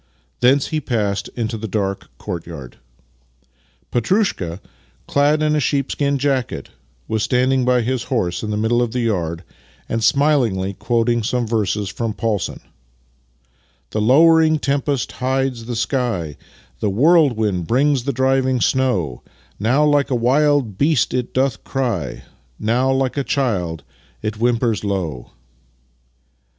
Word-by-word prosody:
Thence 130 +3 +3
he 155 -1 -1
passed 105 -6 -1
into 115 -2 -3
the 110 - -4
dark 100 -1 -2
courtyard. 80 -7 -7 1.1
Petrushka, 120 - 0 0.5
clad 145 +2 +2
in 150 0 +2
a - - +2
sheepskin 140 0 0
jacket, 135 -3 -1 0.4
was 110 -1 -1
standing 125 +2 +2
by 125 -1 +3
his 125 0 -2
horse 90 -9 -1
in 110 - -4
the 105 - -1
middle 115 +3 +1
of 120 -2 -1
the 125 - -1
yard 85 -7 -1 0.4
and 115 0 -2
smilingly 120 -11 +2
quoting 120 +2 0
some 120 +2 -1
verses 105 -2 -1
from 110 +2 -3
Paulson: 110 -5 -2 0.6
" - - -40
The 110 - -1
lowering 155 +6 +5
tempest 140 -3 -1
hides 130 -2 -1
the 120 0 -4
sky, 115 - -1 0.4
The 105 - 0
whirlwind 110 - +3
brings 135 +1 +2
the 140 - +1
driving 130 0 +1
snow; 105 - 0 0.4
Now 125 +9 +3
like 145 -2 +2
a 130 - +1
wild 130 -3 +2
beast 145 -4 +2
it 125 -1 -2
doth 130 -4 0
cry, 115 - -3 0.3
Now 120 +5 +1
like 135 0 0
a 140 - +1
child 95 - -1 0.4
it 105 0 -3
whimpers 115 -1 +1
low." 90 -11 -3
120 Hz, 135 wpm, -20 LUFS, 105-135 Hz, 1.1 s, lowering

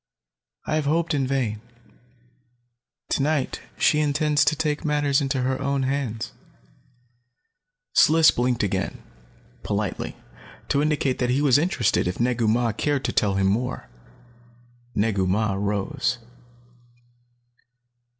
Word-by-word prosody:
I - - -2
have 155 - -1
hoped 165 +3 +1
in 135 -3 0
vain. 120 -6 -1 1.5
Tonight 145 -1 0 0.2
she 150 - +3
intends 150 0 +2
to - - +2
take 150 -1 -1
matters 145 -2 +1
into 135 -2 -1
her 130 +1 -1
own 140 -1 0
hands." 130 -5 -2 1.6
Sliss 160 0 +6
blinked 120 -1 0
again, 100 -1 -2 0.6
politely, - - -3 0.5
to 140 - +2
indicate 145 -3 0
that 125 - 0
he 130 +3 +2
was 145 -2 +4
interested 145 - +1
if 90 - -3
Negu 120 -1 +1
Mah 115 +1 +2
cared 145 +5 -1
to - - 0
tell 100 -2 +1
him 95 0 +1
more. 120 - -1 1.0
Negu 100 -3 +1
Mah 100 +2 +1
rose. 105 +7 -1
130 Hz, 120 wpm, -24 LUFS, 110-145 Hz, 1.6 s, Sliss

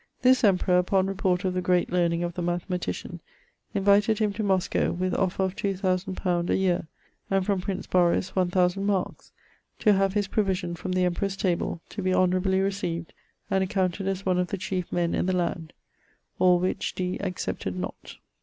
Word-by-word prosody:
This 255 0 +5
emperour, 180 -3 +4
upon 190 +1 +2
report 190 -1 0
of 185 - 0
the 185 - -1
great 180 -1 +1
learning 175 -1 +1
the 175 +1 -5
mathematician, 175 +1 -3 0.5
invited 205 +2 +4
him 210 -2 +1
to 215 - -4
Mosco, 190 -3 +1
with 185 +1 -1
offer 190 0 0
of 190 0 -1
two 200 -1 -1
thousand 185 0 -1
pound 175 -2 -1
a - - +3
yeare, 180 -4 +1 0.4
and 195 -1 +1
from 195 -2 0
Prince 190 0 -4
Boris 180 +1 +2
one 185 -2 +2
thousand 180 +2 +1
markes; 195 -3 -2 0.5
to 210 - +4
have 195 0 +1
his 205 -1 +1
provision 190 -4 -1
from 185 +2 -4
the 185 0 +2
emperor's 190 +2 -1
table, 170 -3 -1
to 205 - -5
be 185 0 +1
honourably 185 +1 +2
recieved, 185 -4 -2 0.4
and 190 0 +3
accounted 190 -1 -1
as 195 0 -2
one 185 -1 +2
of 180 - +1
the 200 - -3
chief 185 -1 -3
men 170 -1 0
in - - 0
the 185 - +1
land. 170 -2 -2 0.7
All 180 -1 +5
which 180 +1 -2
Dee 180 0 -2
accepted 95 - -3
not.' 90 0 -7
185 Hz, 185 wpm, -26 LUFS, 180-195 Hz, 0.7 s, This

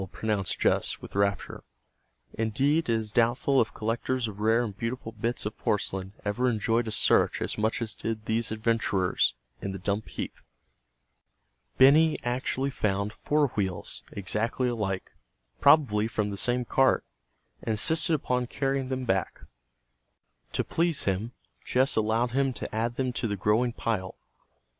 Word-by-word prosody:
pronounced 105 -4 -1
Jess - - +1
with - - -11
rapture. 100 0 -1 0.7
Indeed, 135 +8 +1
it - - +3
is 110 -2 -1
doubtful 120 +4 +3
if 110 -1 -1
collectors 115 +2 -2
of 105 -1 -8
rare 110 +3 +3
and 105 -5 -5
beautiful 115 +2 -4
bits 115 +1 -3
of 105 - -3
porcelain 95 -2 -2
ever 120 +5 +1
enjoyed 115 +1 0
a - - -3
search - - +3
as - - -2
much 110 +2 0
as 110 - -3
did 110 -1 -4
these 110 0 -1
adventurers 110 - +1 0.3
in 95 - -3
the - - -4
dump 100 +3 -2
heap. - - -5 1.4
Benny 150 +4 +6
actually 130 +2 -1
found 100 -2 -1
four 145 +2 +1
wheels, 95 -5 -3
exactly 110 +6 -1
alike, 105 -6 -2 0.5
probably 135 -8 +5
from 105 -2 -2
the - - -4
same 125 +3 +1
cart, 135 +2 +3 0.6
and 110 - -1
insisted 160 +9 +3
upon 125 -4 -1
carrying 135 0 -1
them 130 -1 -2
back. 95 -4 -1 1.1
To - - 0
please 165 -2 0
him, 100 +4 -1 0.3
Jess 130 +2 +2
allowed 110 +2 +1
him 135 +1 +1
to 110 - -6
add 115 +2 -1
them 130 -1 -1
to 120 - -1
the 100 -1 -2
growing 110 +6 +2
pile. 105 -5 -3
115 Hz, 150 wpm, -28 LUFS, 105-130 Hz, 1.4 s, Benny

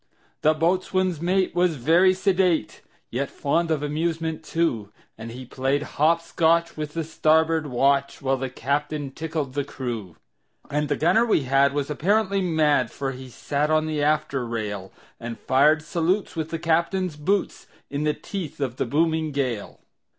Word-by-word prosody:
The 155 +1 +4
boatswain's 180 +1 0
mate 185 +2 +1
was 175 -1 +2
very 170 +8 +4
sedate, 185 - +1 0.3
Yet 135 +4 -2
fond 165 +4 0
of 155 -2 0
amusement, 160 +1 -2
too; 120 -12 -1 0.2
And 115 +1 -8
he 125 +2 -8
played 135 +3 -1
hop 165 +4 +1
scotch 170 0 +2
with 150 0 -5
the 165 - -1
starboard 160 0 +2
watch, 140 +2 +1
While 135 -1 0
the 130 0 -3
captain 145 +2 -2
tickled 155 -3 -4
the 145 +1 -1
crew. 120 - -6 0.6
And 150 0 0
the 145 - +2
gunner 175 +10 +3
we 225 -11 +2
had 135 +1 +3
was 145 0 -1
apparently 195 +5 +1
mad, 155 -8 +2
For 135 +2 -4
he 130 0 -9
sat 145 +4 -2
on 155 0 +2
the 155 -2 -2
after 150 -3 +1
rail, 105 -5 -4 0.3
And 115 -1 -6
fired 150 +7 +3
salutes 175 +5 -1
with 160 -1 -3
the 165 - -3
captain's 170 +1 0
boots, 185 +7 -1 0.2
In 145 +1 -2
the 150 0 +1
teeth 165 -6 -6
of 130 -3 -2
the - - -1
booming 160 +3 +1
gale. 130 -7 -3
150 Hz, 165 wpm, -24 LUFS, 135-165 Hz, 0.6 s, The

